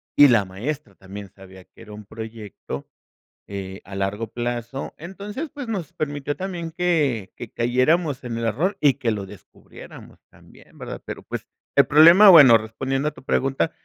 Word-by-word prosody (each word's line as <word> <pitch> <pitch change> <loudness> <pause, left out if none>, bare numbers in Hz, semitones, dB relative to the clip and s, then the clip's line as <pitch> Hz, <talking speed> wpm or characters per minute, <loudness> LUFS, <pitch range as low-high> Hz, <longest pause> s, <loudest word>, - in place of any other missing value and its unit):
y 145 -1 +8
la 110 -5 +3
maestra 130 +11 -6
también 100 +1 -10
sabía 95 -1 -15
que - - -20
era 105 - -12
un 105 0 -11
proyecto, 110 0 -8 0.6
eh, 95 -1 -7
a 95 - -9
largo 100 +3 -2
plazo. 120 +3 -5
Entonces, 205 - -7
pues 285 -4 -7
nos 190 -9 -4
permitió 145 -1 -3
también 175 -3 -5
que 155 - 0
que 120 - -9
cayéramos 130 +5 +1
en 115 -2 -5
el 115 - -2
error 155 - 0
y 145 -3 +4
que 120 -5 -1
lo 105 -2 -4
descubriéramos 100 0 -14
también, - - -20
¿verdad? - - -7
Pero, - - -7
pues - - -7 0.3
el - - +6
problema, 170 +8 +8
bueno, 140 -10 +9
respondiendo 135 +6 -3
a - - -14
tu 145 - -16
pregunta, 135 +4 0
130 Hz, 170 wpm, -22 LUFS, 105-160 Hz, 0.6 s, bueno